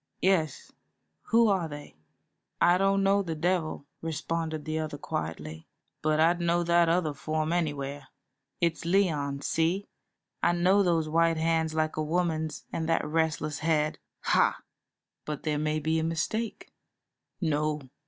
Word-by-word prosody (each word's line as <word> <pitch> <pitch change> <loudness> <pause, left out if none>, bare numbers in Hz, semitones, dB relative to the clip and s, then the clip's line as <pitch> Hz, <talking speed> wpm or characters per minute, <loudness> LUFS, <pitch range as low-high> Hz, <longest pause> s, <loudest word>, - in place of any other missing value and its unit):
"Yes; 180 -5 +1 0.6
who 230 0 +5
are 190 -5 +1
they?" 145 - -9 0.6
"I 175 +2 +5
don't 195 0 +3
know 200 +1 +4
the 165 -4 -3
devil," 160 -3 -1 0.2
responded 160 -1 -3
the 155 0 -2
other, 155 -2 -4
quietly, 80 - -5 0.3
"but 155 0 +1
I'd 170 +2 +3
know 170 0 +2
that 170 0 +4
other 165 -3 +1
form 155 +3 -2
anywhere. 145 -4 -2 0.5
It's 170 -1 0
Leon, 160 -6 +1
see? 170 +5 0 0.5
I - - +3
know 185 +4 +4
those 170 -4 +2
white 165 +1 +2
hands 160 0 +1
like 155 0 0
a 155 - 0
woman's 160 -1 -1
and 160 0 -2
that 165 - +2
restless 155 -1 -1
head. 155 -1 +1 0.2
Ha!" - - +2 0.6
"But 150 -2 -5
there 150 -2 0
may 155 0 0
be 160 +2 0
a - - -1
mistake." 185 +8 -2 0.7
"No. 150 -3 0
160 Hz, 145 wpm, -28 LUFS, 155-175 Hz, 0.7 s, who